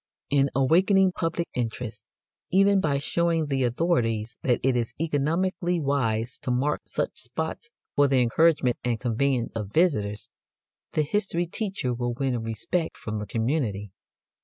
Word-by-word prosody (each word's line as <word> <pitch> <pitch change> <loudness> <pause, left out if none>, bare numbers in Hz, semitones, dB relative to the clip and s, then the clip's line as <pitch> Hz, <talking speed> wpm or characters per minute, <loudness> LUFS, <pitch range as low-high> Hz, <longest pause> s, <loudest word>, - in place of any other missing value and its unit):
In 140 -1 +3
awakening 185 +8 +4
public 170 -1 -2
interest, 115 -3 -4 0.4
even 195 +1 +4
by 145 -4 +1
showing 165 +2 +1
the 135 -2 0
authorities 120 -5 0
that 125 -2 +2
it 130 -1 +3
is 120 -2 -1
economically 170 +4 0
wise 125 -5 -1
to - - -5
mark 130 +4 +1
such - - -2
spots 160 - -4 0.3
for 145 0 +5
the 135 -1 +3
encouragement 130 +1 +3
and 120 -2 0
convenience 125 0 0
of 105 -3 -4
visitors, 105 - +1 0.7
the 155 - +2
history 175 +1 0
teacher 190 - -3
will 120 0 -2
win 130 -2 -1
respect 115 - -2
from 110 -1 -4
the 105 - -5
community. 110 -5 -1
135 Hz, 140 wpm, -26 LUFS, 115-165 Hz, 0.7 s, for